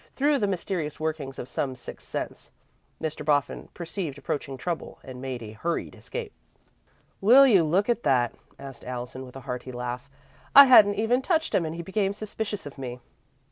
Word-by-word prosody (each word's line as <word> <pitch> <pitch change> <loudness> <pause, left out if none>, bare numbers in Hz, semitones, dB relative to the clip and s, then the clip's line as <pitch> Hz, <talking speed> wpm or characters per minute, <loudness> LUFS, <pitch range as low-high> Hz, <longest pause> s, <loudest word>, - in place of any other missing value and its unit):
Through 285 +1 +3
the 205 - +1
mysterious 175 -5 -3
workings 155 -4 -3
of 125 - -6
some 130 -1 -2
sixth 125 - -9
sense, - - -5 0.5
Mr. 155 -1 -4
Boffin 145 -2 0
perceived 170 -4 -5
approaching 140 -1 -4
trouble 170 +5 -4
and 130 -2 -9
made 130 -3 -4
a 105 - -8
hurried 165 +11 -3
escape. 480 -2 -6 0.9
"Will 250 +7 +8
you 200 -10 +6
look 180 +6 +2
at 240 -1 +1
that?" 125 -4 +2 0.2
asked 135 -3 -10
Allison, 125 +1 -6
with 125 - -14
a 135 - -7
hearty 125 +1 -5
laugh. 125 +2 -5 0.5
"I 280 0 +12
hadn't 210 -6 +7
even 225 +5 +2
touched 320 +2 0
him 170 - +2
and 160 - -5
he 170 - -5
became 195 +2 0
suspicious 210 0 -5
of 145 -1 -9
me." 125 -2 -5
155 Hz, 180 wpm, -26 LUFS, 130-205 Hz, 0.9 s, I